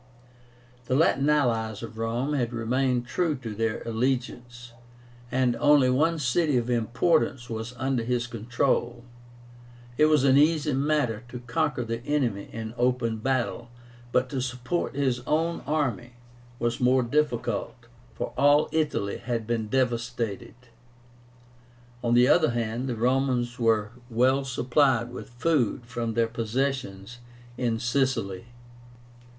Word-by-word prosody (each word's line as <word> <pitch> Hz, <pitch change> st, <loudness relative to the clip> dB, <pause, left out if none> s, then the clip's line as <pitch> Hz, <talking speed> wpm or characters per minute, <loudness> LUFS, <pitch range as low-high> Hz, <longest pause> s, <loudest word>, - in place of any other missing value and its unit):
The 130 Hz, -, 0 dB
Latin 140 Hz, -1 st, +3 dB
allies 115 Hz, -7 st, +1 dB
of 115 Hz, -1 st, -8 dB
Rome 120 Hz, +6 st, -1 dB
had 125 Hz, -4 st, -1 dB
remained 125 Hz, +2 st, 0 dB
true 160 Hz, +4 st, 0 dB
to 115 Hz, -5 st, -7 dB
their 115 Hz, +1 st, -2 dB
allegiance, 120 Hz, 0 st, -3 dB, 0.6 s
and 125 Hz, -2 st, +2 dB
only 145 Hz, -2 st, +5 dB
one 160 Hz, +6 st, +2 dB
city 150 Hz, +1 st, +1 dB
of 120 Hz, 0 st, -1 dB
importance 120 Hz, +2 st, +1 dB
was 115 Hz, +2 st, -5 dB
under 130 Hz, -1 st, -1 dB
his 125 Hz, +1 st, -1 dB
control. 120 Hz, +1 st, -1 dB, 1.0 s
It 155 Hz, -, +6 dB
was 155 Hz, -3 st, +3 dB
an 135 Hz, -1 st, +5 dB
easy 150 Hz, -1 st, +3 dB
matter 135 Hz, -5 st, 0 dB
to 125 Hz, 0 st, -7 dB
conquer 130 Hz, +2 st, -1 dB
the 115 Hz, +1 st, -4 dB
enemy 125 Hz, -9 st, -1 dB
in 110 Hz, 0 st, -6 dB
open 120 Hz, -3 st, +1 dB
battle, 120 Hz, 0 st, -1 dB, 0.4 s
but 125 Hz, +1 st, +2 dB
to 135 Hz, -1 st, -2 dB
support 125 Hz, +6 st, -3 dB
his 130 Hz, -3 st, 0 dB
own 165 Hz, +2 st, 0 dB
army 125 Hz, -6 st, -1 dB, 0.4 s
was 120 Hz, -1 st, -1 dB
more 125 Hz, +1 st, +4 dB
difficult, 120 Hz, -3 st, -1 dB, 0.3 s
for -, -, -4 dB
all 145 Hz, +1 st, +4 dB
Italy 150 Hz, -10 st, -1 dB
had 120 Hz, -2 st, -3 dB
been 115 Hz, -1 st, -2 dB
devastated. 120 Hz, -3 st, -2 dB, 1.5 s
On 120 Hz, 0 st, +2 dB
the 125 Hz, +1 st, +6 dB
other 160 Hz, +2 st, +4 dB
hand, 120 Hz, +2 st, -2 dB
the 120 Hz, -, -2 dB
Romans 125 Hz, 0 st, 0 dB
were 115 Hz, -2 st, +2 dB, 0.2 s
well 130 Hz, +4 st, +2 dB
supplied 125 Hz, -1 st, +1 dB
with 125 Hz, -, -8 dB
food 125 Hz, -2 st, 0 dB
from 115 Hz, -2 st, -4 dB
their 115 Hz, -1 st, +3 dB
possessions 115 Hz, -2 st, -3 dB, 0.4 s
in 120 Hz, -2 st, -1 dB
Sicily. 120 Hz, -4 st, -1 dB
125 Hz, 130 wpm, -26 LUFS, 115-135 Hz, 1.5 s, It